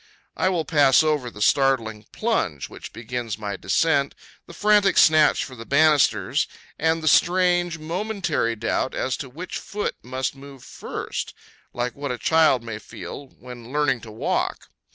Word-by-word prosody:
I 185 - +1
will 170 -4 -1
pass 145 -2 +4
over 150 -5 0
the 105 -3 -4
startling 115 -6 +1
plunge 100 - -1
which - - -10
begins 115 -1 -5
my 105 -2 -4
descent, 140 +9 +1 0.3
the - - -11
frantic 210 -2 +3
snatch 155 -1 +5
for 130 - -11
the 115 - -9
banisters, 150 +2 +3 0.3
and 160 +1 +1
the - - -2
strange, 175 +1 +3
momentary 170 - -2
doubt 115 +3 -2
as 130 0 -1
to 135 - -7
which 170 +8 -6
foot 205 +1 -4
must 130 +2 -3
move 135 -2 -13
first, - - -6 0.4
like 120 0 -3
what 140 -1 -4
a 125 - -3
child 155 -4 +3
may 115 -2 -6
feel 140 +5 -9
when 125 -1 -12
learning 145 -4 +1
to 110 - -10
walk. 110 - -2
140 Hz, 155 wpm, -23 LUFS, 120-160 Hz, 0.4 s, snatch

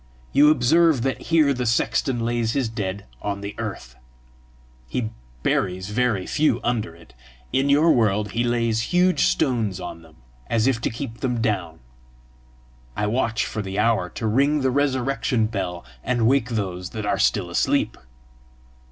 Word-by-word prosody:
You 150 +1 +6
observe 155 0 +4
that 135 0 -1
here 155 -4 +4
the 125 -2 -2
sexton 120 +2 +1
lays 120 -1 0
his 135 -4 0
dead 100 -3 -4 0.2
on 100 -1 -3
the 100 +1 -5
earth; 95 - -6 0.9
he 115 -3 -2 0.3
buries 95 +2 0
very 110 -5 0
few 145 -6 +1
under 110 -8 -1
it! 85 -1 -18 0.4
In 135 +2 +2
your 150 +4 +5
world 105 -3 +2
he 120 - 0
lays 115 -2 +1
huge 180 +1 +3
stones 115 - 0
on 85 - -7
them, 80 -1 -18 0.3
as 115 -1 +1
if 130 -4 +1
to - - 0
keep 115 -1 -6
them 125 -3 -1
down; 95 - -2 1.2
I 105 - 0
watch 115 0 0
for 110 - -4
the 95 0 -5
hour 105 -4 +2
to 115 - -6
ring 140 +7 +2
the 130 -1 +1
resurrection 130 -3 +1
bell, 95 -5 -4 0.2
and 120 -2 +1
wake 125 -1 +2
those 95 -5 -3
that 105 - -3
are - - 0
still - - +1
asleep. - - +1
115 Hz, 160 wpm, -23 LUFS, 105-130 Hz, 1.2 s, You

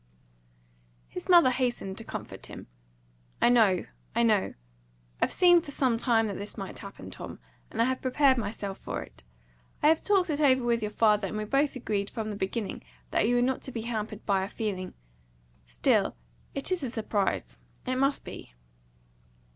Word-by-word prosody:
His 180 - -8
mother 340 -7 +7
hastened 245 -7 -1
to - - -7
comfort - - -7
him. - - -9 0.7
"I - - +5
know 215 -7 +4 0.3
I 235 - +3
know. 215 -4 +2 0.7
I've - - +2
seen 350 -2 +6
for 310 - -11
some 260 -4 +1
time 230 -2 +3
that 200 -3 -4
this 205 +3 -5
might 195 -2 -6
happen, 200 0 -9
Tom, - - -8 0.3
and 225 - -7
I 230 - +5
have 260 +1 -1
prepared 265 +1 +4
myself 200 -2 -4
for - - -4
it. - - -16 0.6
I 300 - +7
have 320 0 +3
talked 380 -5 +3
it 295 0 -1
over 260 -3 +4
with 235 -1 +1
your 210 - -1
father, 210 -2 +3
and 215 - -4
we 215 - -2
both 275 +6 +1
agreed 205 -5 -2
from 215 -1 -4
the - - -4
beginning 200 +2 -3 0.3
that - - +2
you 245 - +3
were 245 - +3
not 260 +1 0
to 265 - -6
be 230 - -4
hampered 220 -2 -4
by 195 -2 +2
our 190 - -3
feeling. 195 -5 -4 0.7
Still - - +2 0.4
it 275 - -2
is 370 - +1
a 265 - -2
surprise. 215 -3 -1 0.3
It 255 0 -1
must 275 +2 +1
be." - - -10
230 Hz, 185 wpm, -28 LUFS, 205-260 Hz, 0.7 s, mother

